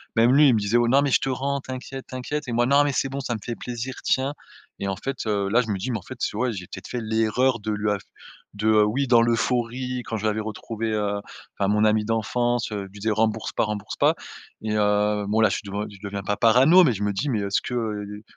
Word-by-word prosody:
même 115 +3 +5
lui, 145 +1 +7
il 125 - +5
me - - +2
disait: 105 +4 +1
«Oh 120 0 +3
non, 140 +3 +4
mais 140 - 0
je - - +5
te 135 - -2
rends, 140 +2 -1
t'inquiète, 130 0 -7
t'inquiète» 135 +3 -4
et - - -3
moi: 120 +1 +3
«Non, 140 +2 +5
mais 145 - +1
c'est 135 - 0
bon, 140 +1 -4
ça 120 -3 -2
me - - -5
fait 120 - -4
plaisir, 125 +1 -5
tiens!» 135 +2 +1 0.5
et 100 - -1
en 95 - -1
fait, 135 +1 -5
heu, 100 -2 0
là, 120 +4 +4
je 115 - -6
me 100 - 0
dis: 115 +7 -3
«Mais 115 - -1
en - - -14
fait, 130 - -9
tu 105 - -2
ouais 125 +1 +1
j'ai 90 -2 -6
peut-être 95 +1 -9
fait 120 - -4
l'erreur 110 +3 +1
de 110 +1 -3
lui 105 0 0
af 100 - -2 0.5
de», 105 +2 -2 0.2
oui, 135 +6 0
dans 120 -1 +6
l'euphorie 125 +2 0
quand 110 - -4
je 110 - -4
l'avais 110 0 +1
retrouvé, 110 +1 -4
heu, 105 -1 -1 0.4
enfin, 100 - +2
mon 105 +1 +2
ami 105 0 +2
d'enfance, 115 +1 0
heu, 100 -2 -3
je - - -18
lui 100 - -12
disait: 110 +2 0
«Rembourse 110 0 0
pas, - - 0
rembourse 105 -1 -5
pas!» - - +3 0.5
et 110 0 -2
heu, 105 0 +2
bon, 110 +2 +2
là, 110 - +5
je - - -1
suis 100 - -6
de - - -8 0.2
je 100 - -13
deviens 100 -1 -4
pas 105 0 -1
parano 130 - +6
mais 140 - +4
je 105 0 -4
me 105 - +1
dis 125 +9 -2
mais: 110 -5 0
«Est-ce 100 -1 0
que, - - -6
heu, 105 -2 -4
115 Hz, 275 wpm, -24 LUFS, 105-125 Hz, 0.5 s, lui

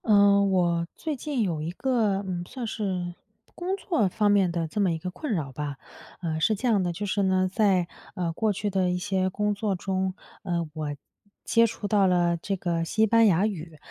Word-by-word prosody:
呃， 200 -2 +5
我 175 -3 +2
最 310 -2 -3
近 270 -2 -2
有 165 -6 -1
一 155 - -3
个， 210 -1 0
嗯， 175 -2 -3
算 250 -2 -6
是 190 -5 -3 0.4
工 370 +3 -2
作 330 - +1
方 205 +2 +2
面 195 -3 +3
的 170 -1 -1
这 205 +6 -2
么 190 -3 +3
一 165 - -1
个 180 +3 -5
困 300 - -5
扰 150 -7 -2
吧。 145 +1 -5 0.5
呃， 160 -2 -1
是 215 +8 +2
这 250 +5 -2
样 215 -5 +3
的 175 -1 0
就 200 +5 -4
是 205 +1 0
呢， 185 -1 +2
在， 190 -5 +3 0.3
呃， 170 -2 -2
过 215 +5 +1
去 205 +1 -2
的 185 -1 +1
一 180 - 0
些 190 0 0
工 210 +2 0
作 205 -1 -1
中， 190 0 -2 0.3
呃， 170 -2 -2
我 150 -2 -4 0.5
接 230 0 +4
触 215 -1 -5
到 200 -1 +4
了 175 -1 +2
这 195 +4 -3
个 170 -2 -1
西 215 +6 +2
班 230 +1 +5
牙 190 +1 +3
语， 165 -6 -6
190 Hz, 225 characters per minute, -26 LUFS, 175-210 Hz, 0.5 s, 呃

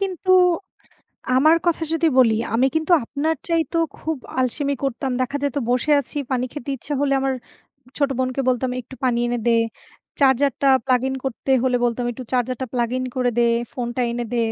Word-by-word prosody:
কিন্তু, 375 -1 -2 1.1
আমার 310 +4 +6
কথা 335 -1 +1
যদি 325 0 +2
বলি। 235 -4 +6 0.2
আমি 250 +3 +3
কিন্তু 320 +2 0
আপনার 300 +6 -1
চাইতেও 330 0 +1 0.2
খুব 320 -2 -3 0.2
আলসেমি 280 +3 0
করতাম। 270 0 -2
দেখা 265 +3 -1
যায় 285 -2 0
তো - - +2
বসে 250 +5 +1
আছি, 285 +2 -6
পানি 255 0 +1
খেতে 285 -2 -7
ইচ্ছা 285 +5 -5
হলে 275 -1 +2
আমার 270 -1 0 0.6
ছোট 285 -1 +2
বোনকে 255 +1 0
বলতাম 255 0 0
"একটু 260 +3 -13
পানি 240 -2 +2
এনে 240 0 -1
দে।" - - +5 0.7
চার্জার 275 0 +4
টা 275 - +3 0.2
প্লাগ 250 -2 +3
ইন 265 - -2
করতে 270 +1 -3
হলে 255 -1 +2
বলতাম 240 +1 -1
"একটু 255 +2 -8
চার্জার 250 0 0
টা - - 0
প্লাগ 240 -2 0
ইন 255 - -2
করে 250 -1 +1
দে, 240 - +4 0.3
ফোনটা 245 -1 -3
এনে 240 0 -2
দে, - - 0
265 Hz, 190 wpm, -22 LUFS, 245-290 Hz, 1.1 s, আমার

